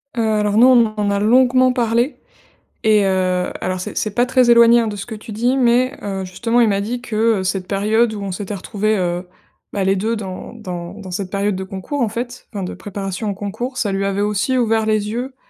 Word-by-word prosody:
Heu, 235 - 0
alors 210 -1 +1
non, 235 -2 +6
on - - -1
en 205 - +1
a 200 - +1
longuement 255 +3 +4
parlé 240 +2 0 0.7
et 215 -2 +4
heu, 185 -1 +1
alors 185 0 -2
c'est 210 +4 -6
c'est 215 - -1
pas 240 +3 +2
très 250 -1 +3
éloigné, 235 0 +7
hein, 225 - -1
de 210 - -4
ce 200 - -6
que 220 - -7
tu 215 +1 -10
dis 240 +5 +1
mais 255 +2 +2
heu, 195 -2 -3
justement, 230 +6 0
il 230 - +4
m'a 200 -1 +1
dit 240 +4 -3
que, 245 -3 -6 0.2
heu, 185 - -3
cette 185 0 -2
période 215 +3 +1
où 205 - -6
on 195 -1 -4
s'était 205 +2 -5
retrouvé, 210 +2 -1
heu, 180 0 -2 0.4
bah 200 - -1
les 195 +1 +3
2 220 +4 -1
dans 190 -3 -7
dans 180 -5 -7
dans 200 -3 -9
cette 190 0 -4
période 200 0 0
de 190 - -4
concours 195 +9 -5
en 230 - +1
fait, 240 +3 -6
enfin 200 -2 -4
de 180 - -5
préparation 195 0 -5
au - - -1
concours, 215 +6 -5
ça 210 -4 0
lui 195 0 -1
avait 195 0 -1
aussi 210 +5 0
ouvert 225 -2 +2
les 215 -1 0
yeux, 250 +4 -4
210 Hz, 235 wpm, -19 LUFS, 195-235 Hz, 0.7 s, éloigné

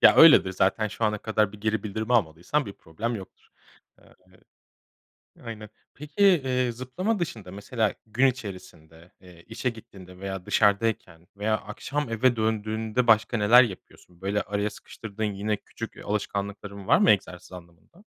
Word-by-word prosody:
Ya, - - +7
öyledir 150 - +8
zaten, 100 +4 +1
şu 110 - -3
ana 105 -1 +1
kadar 110 -1 0
bir 105 - -12
geri 110 -1 -1
bildirim 110 +2 -4
almadıysan 105 - +1
bir 100 - -6
problem 105 +8 -5
yoktur. 95 -2 -13 0.5
Eee - - -22 1.3
Aynen. 110 -3 -8 0.2
Peki, 150 +2 -11
eee, 130 -10 +3
zıplama 130 - -3
dışında 110 - -5
mesela 105 +2 -1
gün 120 +5 +2
içerisinde, 90 -8 -7
eee, 90 -2 -16
işe 115 +3 -2
gittiğinde 95 -5 -13
veya 95 -1 -5
dışarıdayken 100 -5 +1
veya 110 +1 +1
akşam 140 +6 -4
eve 120 +2 +2
döndüğünde 110 +2 -1
başka 110 +1 +4
neler 115 +5 +7
yapıyorsun? 90 -4 -9
Böyle 100 +2 0
araya 100 +1 -2
sıkıştırdığın 110 0 -8
yine 105 0 -1
küçük, - - -9
eee, - - -11
alışkanlıkların 100 -1 -4
var - - +6
mı - - +5
egzersiz 95 -3 -2
anlamında? 90 - -15
105 Hz, 150 wpm, -26 LUFS, 95-115 Hz, 1.3 s, öyledir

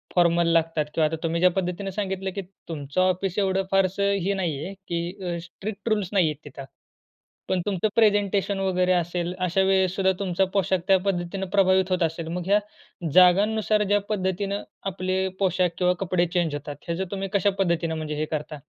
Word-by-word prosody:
Formal 170 -1 +4
लागतात 165 -2 +1
किंवा 160 - +2
आता 160 - -3
तुम्ही 165 +1 0
ज्या 180 - +6
पद्धतीनं 185 +2 -2
सांगितलं 195 -1 -3
की 200 - -2 0.3
तुमचं 145 +1 -2
ऑफिस 185 +1 0
एवढं 195 -1 +1
फारसं 195 +1 +2
हे 200 - +1
नाही 165 -7 -2
आहे 195 +4 -6
की 175 +3 -4
अ, - - -3
स्ट्रिक्ट 195 +5 -6
रूल्स 210 -4 0
नाहीये 175 -6 +3
तिथं. 140 -1 -9 0.8
पण 185 - +1
तुमचं 200 0 0
प्रेझेंटेशन 205 -2 +2
वगैरे 185 -1 +1
असेल, 175 0 -1
अशा 185 +1 +1
वेळेस 190 -1 +2
सुद्धा 190 -1 +3
तुमचा 190 -1 +1
पोशाख 190 -1 +1
त्या 190 -1 +6
पद्धतीनं 190 0 -1
प्रभावित 190 -1 +3
होत 180 -2 +2
असेल. 165 0 -2
मग 175 +2 -3
ह्या 205 +1 +5 0.5
जागांनुसार 210 +4 +4
ज्या 205 0 +2
पद्धतीनं 200 0 -1 0.3
आपले 185 +1 -1
पोशाख 185 -2 +2
किंवा 180 0 +3
कपडे 185 -2 +1
चेंज 170 -4 +1
होतात 145 0 -6
ह्याचं 175 +3 -2
तुम्ही 195 -1 -3
कशा 200 0 +3
पद्धतीनं 170 -3 +1
म्हणजे 155 -1 -4
हे 155 +1 -1
करता? 150 0 -4
185 Hz, 175 wpm, -25 LUFS, 170-195 Hz, 0.8 s, ज्या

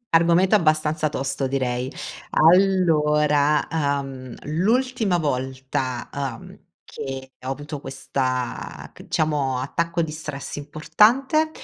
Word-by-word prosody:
Argomento, 170 +4 +4
abbastanza 155 -4 +2
tosto 135 -1 -2
direi. 130 -1 -1 0.4
Allora, 150 -5 +4
ehm, 140 -4 -2
l'ultima 215 - +1
volta, 130 -3 -2
ehm, 135 -5 -5 0.3
che 135 -1 -7
ho 130 - -4
avuto 145 +2 -5
questa, 130 -2 -3
c - - -14
diciamo 145 -4 0
attacco 170 +6 -1
di 160 - -4
stress 150 -3 -6
importante 225 - +2
150 Hz, 100 wpm, -23 LUFS, 135-170 Hz, 0.4 s, Argomento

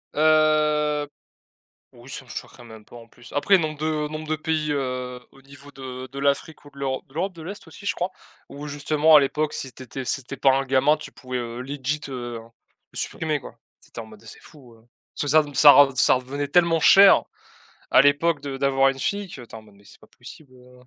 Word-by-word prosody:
Heu, 150 -1 +2 0.9
oui, - - -16
ça - - -7
me - - -22
choquerait 120 - -9
même 110 -2 -13
pas - - -16
en 115 -1 -12
plus. 120 +1 -17
Après 190 +7 +4
nombre 155 -3 -3
de 155 -1 -1
nombre 155 0 -7
de 155 - 0
pays, 155 -1 -2
heu, 125 -3 -3
au 135 - -20
niveau 140 +1 -15
de 130 -1 -8
de 140 - -7
l'Afrique 140 +3 -2
ou - - -13
de 140 - -21
l'Euro 135 -1 -3
de 135 - -24
l'Europe 185 +5 -2
de 165 - -12
l'Est 200 +5 -9
aussi, 200 - -13
je 225 - 0
crois. 180 +2 -3 0.4
Où 145 +1 -8
justement 150 +2 +3
à - - +10
l'époque 150 +2 -1
si 135 - -6
tu 130 - -12
étais 130 +2 -7
si 130 +2 -2
tu 130 - -10
étais - - -6
pas 135 - +4
un 135 - 0
gamin, 135 +3 +3
tu - - -11
pouvais, 130 -1 -6
heu, 120 0 -5
legit 140 +2 -4
heu, 120 -3 -6 0.5
le - - -12
supprimer, 155 -2 -2
quoi. 120 -3 -13 0.2
C'était 115 - -10
en - - -10
mode, 110 -1 -16
heu, - - -19
c'est 110 - -13
fou! 130 -6 -17
Heu, 115 0 -23 0.3
parce - - 0
que 145 - -2
ça 155 +3 +5
re 145 -2 -10
ça 145 0 +9
rev 140 -1 +6
ça 130 - +4
revenait 135 +3 -4
tellement 170 +2 +3
cher 195 +5 +7 0.7
à - - +7
l'époque, 145 +3 +2
de 140 -2 -6
d'avoir 135 0 +2
une 135 0 -5
fille, 200 +8 -2
qu'attend 120 -6 -11
non 105 - -20
mais 100 +1 -22
c'est - - -18
pas - - -20
possible, 140 -5 -15
heu 125 0 -19
140 Hz, 235 wpm, -23 LUFS, 130-155 Hz, 0.9 s, à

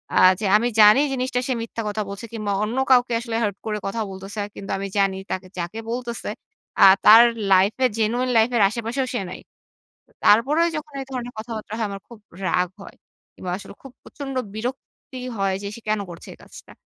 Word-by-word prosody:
আ - - +2 0.2
যে, 215 - -3
আমি 235 +3 0
জানি 210 +5 +8
জিনিসটা 255 -1 -1
সে 260 - +1
মিথ্যা 230 0 -5
কথা 210 +1 -2
বলছে 200 +3 -7
কিংবা, 215 -3 -3
অন্য 220 +4 -3
কাউকে 245 -1 +4
আসলে 230 -1 -5
হার্ট 205 -2 -1
করে 215 -1 -2
কথা 225 +3 -3
বলতেছে। 195 +2 -6
কিন্তু 195 - -7
আমি 195 0 -4
জানি 195 -1 +2
তাকে 185 0 -4
যাকে 175 +5 -4
বলতেছে 240 -1 -4 0.5
আ - - +11 0.2
তার 225 +2 +10 0.3
লাইফে 195 +7 +4
genuine 240 +3 0
life 225 +2 +4
এর - - +3
আশেপাশেও 235 +4 -3
সে 245 - -1
নাই। 185 - -8 0.7
ত - - -35 0.2
তারপরেও 285 +10 +4
যখন 305 -1 -8
এ - - -4
ধরনের 245 -1 -5
কথাবার্তা 220 -1 -7
হয় 225 - -1
আমার 200 0 -6
খুব 235 -3 -13 0.3
রাগ 180 +1 +1
হয়। - - -12 0.4
কিংবা 180 - -6
আসলে 200 - -11
খুব 270 - -12
প্রচন্ড 275 -2 -8 0.2
বিরক্তি 255 +2 -7 0.2
হয় 195 -1 0
যে, - - -4
সে 235 - -12
কেন 215 0 +1
করছে 170 0 -11
এই - - -17
কাজটা? - - -14
225 Hz, 195 wpm, -23 LUFS, 200-245 Hz, 0.7 s, আ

